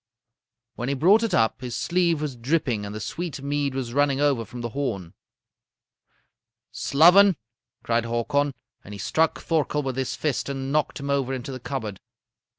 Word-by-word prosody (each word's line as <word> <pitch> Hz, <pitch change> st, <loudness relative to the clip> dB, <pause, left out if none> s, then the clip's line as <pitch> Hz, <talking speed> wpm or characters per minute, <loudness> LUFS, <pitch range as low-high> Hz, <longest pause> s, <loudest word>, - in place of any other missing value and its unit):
"When 120 Hz, +3 st, -4 dB
he 140 Hz, -, 0 dB
brought 190 Hz, +11 st, +5 dB
it 225 Hz, -5 st, 0 dB
up, 115 Hz, +2 st, +2 dB
his 125 Hz, -2 st, -4 dB
sleeve 170 Hz, -3 st, +1 dB
was 150 Hz, -4 st, -3 dB
dripping 120 Hz, -4 st, -1 dB
and 100 Hz, -, -7 dB
the -, -, -4 dB
sweet 165 Hz, -, -5 dB
mead 140 Hz, -1 st, -1 dB
was 125 Hz, -3 st, -3 dB
running 140 Hz, -1 st, +2 dB
over 140 Hz, -6 st, +2 dB
from 120 Hz, +4 st, -8 dB
the 120 Hz, -, -3 dB
horn. 110 Hz, -10 st, -3 dB, 1.6 s
"'Sloven!' 180 Hz, +6 st, +5 dB, 0.5 s
cried 115 Hz, 0 st, +1 dB
Hakon, 130 Hz, +4 st, 0 dB, 0.3 s
and 105 Hz, -, -9 dB
he -, -, -8 dB
struck 160 Hz, +10 st, +1 dB
Thorkel 150 Hz, -2 st, 0 dB
with 130 Hz, -1 st, -3 dB
his 130 Hz, -1 st, -2 dB
fist 145 Hz, -3 st, -2 dB
and 135 Hz, 0 st, -3 dB
knocked 150 Hz, -1 st, 0 dB
him 140 Hz, 0 st, -2 dB
over 135 Hz, -1 st, 0 dB
into 130 Hz, +1 st, -6 dB
the 130 Hz, -, -6 dB
cupboard. 110 Hz, -7 st, -5 dB
135 Hz, 170 wpm, -25 LUFS, 120-150 Hz, 1.6 s, brought